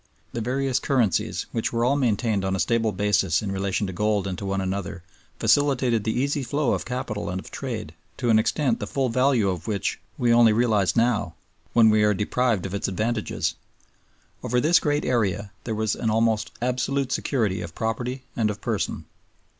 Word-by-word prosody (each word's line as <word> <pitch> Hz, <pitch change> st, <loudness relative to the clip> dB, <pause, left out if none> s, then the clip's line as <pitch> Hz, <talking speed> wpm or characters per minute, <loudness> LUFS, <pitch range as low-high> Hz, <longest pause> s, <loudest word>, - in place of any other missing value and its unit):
The 115 Hz, -, -3 dB
various 130 Hz, +2 st, 0 dB
currencies, 120 Hz, -, 0 dB
which 115 Hz, -, -1 dB
were 115 Hz, 0 st, +1 dB
all 135 Hz, +3 st, +3 dB
maintained 110 Hz, -6 st, +1 dB
on 95 Hz, 0 st, 0 dB
a -, -, -3 dB
stable 115 Hz, 0 st, +1 dB
basis 100 Hz, -4 st, +1 dB
in 100 Hz, -, -3 dB
relation 95 Hz, +1 st, -1 dB
to 95 Hz, -, -5 dB
gold 105 Hz, +1 st, 0 dB
and 95 Hz, -2 st, -3 dB
to 100 Hz, -, -5 dB
one 95 Hz, 0 st, -1 dB
another, 95 Hz, -1 st, -3 dB, 0.3 s
facilitated 130 Hz, -6 st, +2 dB
the 110 Hz, +2 st, 0 dB
easy 140 Hz, +2 st, 0 dB
flow 140 Hz, +2 st, 0 dB
of -, -, -2 dB
capital 120 Hz, -6 st, -4 dB
and 90 Hz, +1 st, -3 dB
of -, -, -11 dB
trade 110 Hz, -, -5 dB, 0.2 s
to 120 Hz, -3 st, +1 dB
an 110 Hz, -, +6 dB
extent 125 Hz, +1 st, +1 dB
the 105 Hz, -, -4 dB
full 135 Hz, +1 st, 0 dB
value 125 Hz, -3 st, +2 dB
of 90 Hz, -4 st, -3 dB
which 100 Hz, -4 st, -1 dB, 0.2 s
we 120 Hz, -1 st, +3 dB
only 115 Hz, -2 st, +6 dB
realize 105 Hz, -7 st, +2 dB
now, 115 Hz, -8 st, +1 dB, 0.4 s
when 110 Hz, -2 st, +6 dB
we 105 Hz, 0 st, +3 dB
are 105 Hz, -1 st, +3 dB
deprived 110 Hz, 0 st, 0 dB
of 95 Hz, -, -5 dB
its 100 Hz, -, -1 dB
advantages. 110 Hz, +3 st, -1 dB, 0.9 s
Over 125 Hz, +1 st, 0 dB
this 160 Hz, +7 st, +4 dB
great 145 Hz, -1 st, 0 dB
area 105 Hz, -4 st, 0 dB
there 110 Hz, -, -2 dB
was 110 Hz, -1 st, 0 dB
an 115 Hz, -, -1 dB
almost 110 Hz, -1 st, +1 dB
absolute 125 Hz, +2 st, 0 dB
security 110 Hz, -9 st, 0 dB
of 85 Hz, -2 st, -8 dB
property 125 Hz, +4 st, -3 dB
and 110 Hz, -2 st, +1 dB
of 105 Hz, -1 st, -4 dB
person. -, -, -2 dB
110 Hz, 190 wpm, -24 LUFS, 100-125 Hz, 0.9 s, an